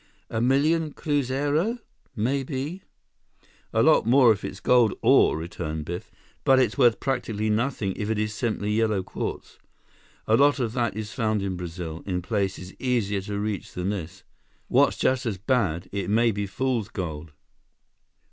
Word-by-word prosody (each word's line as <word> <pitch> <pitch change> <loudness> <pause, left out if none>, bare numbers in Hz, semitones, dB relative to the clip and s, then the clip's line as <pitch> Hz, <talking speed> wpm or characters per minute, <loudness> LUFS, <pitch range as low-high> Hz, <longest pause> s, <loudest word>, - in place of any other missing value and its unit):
A 110 - -1
million 150 +5 +2
cruzeiro—maybe?" 145 - -2 0.9
"A - - +2
lot - - +4
more, 125 -1 +6
if 105 -2 -1
it's 95 - -6
gold 120 -3 +4
ore," - - +5
returned 80 -2 -5
Biff. 85 +2 -6 0.3
"But 135 - +5
it's 125 -4 +2
worth 120 -4 +4
practically 110 -5 -1
nothing 110 -3 0
if 105 0 -3
it 110 - 0
is 105 0 -1
simply 110 -2 -2
yellow 110 -3 +1
quartz. - - -6 0.7
A 110 - +4
lot 145 +3 +4
of 115 -3 -1
that 120 -5 -1
is 110 -1 -5
found 110 -5 0
in 95 -2 -2
Brazil, 85 -1 -6
in 90 -2 -2
places 95 -3 -2
easier 110 -6 0
to 100 +1 -5
reach 105 -1 -3
than 90 +2 -2
this. 95 -1 -6 0.5
What's - - +3
just 130 -1 +1
as 105 -4 -2
bad, 95 - 0
it 100 0 -3
may 115 +2 +3
be 100 -1 -3
fool's 120 0 -1
gold." 80 -4 -5
110 Hz, 155 wpm, -25 LUFS, 95-130 Hz, 0.9 s, more